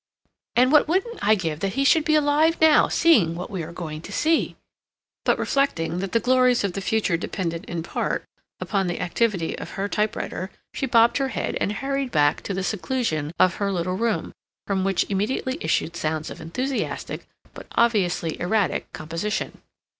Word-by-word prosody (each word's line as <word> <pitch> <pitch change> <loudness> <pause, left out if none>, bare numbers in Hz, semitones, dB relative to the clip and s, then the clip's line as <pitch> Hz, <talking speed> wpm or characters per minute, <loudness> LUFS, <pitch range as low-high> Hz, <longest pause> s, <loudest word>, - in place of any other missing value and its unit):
And 255 +2 +4
what 300 0 +5
wouldn't 390 +8 -1
I 215 +1 +4
give 165 -6 -3
that 195 +1 -2
he 275 - +1
should 300 +2 +4
be 310 - +3
alive 305 +2 +3
now, 315 -1 +6
seeing 215 - +4
what 180 +4 -6
we're 170 -4 -4
going 155 -3 -6
to - - -10
see—" 320 +1 +1 0.7
but - - +3
reflecting 175 -12 0
that 195 0 -3
the 230 - +3
glories 250 -1 +3
of 200 -3 -1
the 195 - -4
future 200 -4 +1
depended 170 0 -4
in 170 -4 -4
part - - -2 0.3
upon 195 -3 -1
the 175 - -3
activity 180 -1 0
of - - -8
her 195 +1 -1
typewriter, 210 -3 -2 0.2
she 270 - -2
bobbed 230 -1 +4
her 270 - +1
head, - - -3
and - - +1
hurried 275 +3 -2
back 145 -7 +2
to 200 - -4
the 190 - -2
seclusion 190 - -1
of 185 - +3
her 200 -1 0
little 180 0 -1
room, 230 +2 -1 0.3
from 195 -2 0
which 195 -2 +1
immediately 260 +8 -1
issued 170 - 0
sounds 155 -1 -2
of - - -9
enthusiastic, 255 +11 -3 0.3
but - - -11
obviously 185 -8 +1
erratic, 190 -1 0
composition. 165 +7 -4
200 Hz, 175 wpm, -24 LUFS, 175-260 Hz, 0.7 s, now